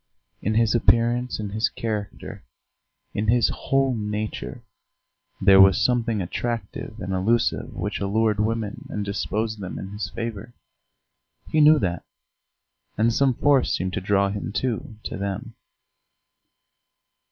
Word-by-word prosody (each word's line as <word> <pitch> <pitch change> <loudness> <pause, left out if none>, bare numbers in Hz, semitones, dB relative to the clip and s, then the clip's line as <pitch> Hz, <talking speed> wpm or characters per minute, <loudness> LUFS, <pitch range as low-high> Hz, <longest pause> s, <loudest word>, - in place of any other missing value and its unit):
In 110 +2 -1
his 115 0 +3
appearance, 120 +1 +2
in 105 -2 -4
his 110 +2 +1
character, 105 -3 -5 0.7
in 105 - -2
his 120 +2 +4
whole 135 -1 +1
nature, 105 +3 -4 0.8
there 95 0 +7
was 95 -1 +6
something 115 -5 +1
attractive 115 +3 -4
and 95 +1 -4
elusive 110 +6 +1
which 100 +4 -3
allured 105 +1 +1
women 110 -1 -2
and 105 -1 -3
disposed 110 +2 -2
them 95 -2 -6
in 95 - -6
his 105 0 -4
favour; 115 0 -6 1.0
he 155 - +3
knew 155 +1 +7
that, 90 - -2 0.9
and 115 +2 +3
some 135 0 +2
force 140 -1 +3
seemed 95 +1 -3
to 100 - -2
draw 100 +1 +2
him, 100 0 -4
too, 115 -1 -2
to - - -5
them. 100 +4 -4
110 Hz, 130 wpm, -24 LUFS, 100-115 Hz, 1.0 s, there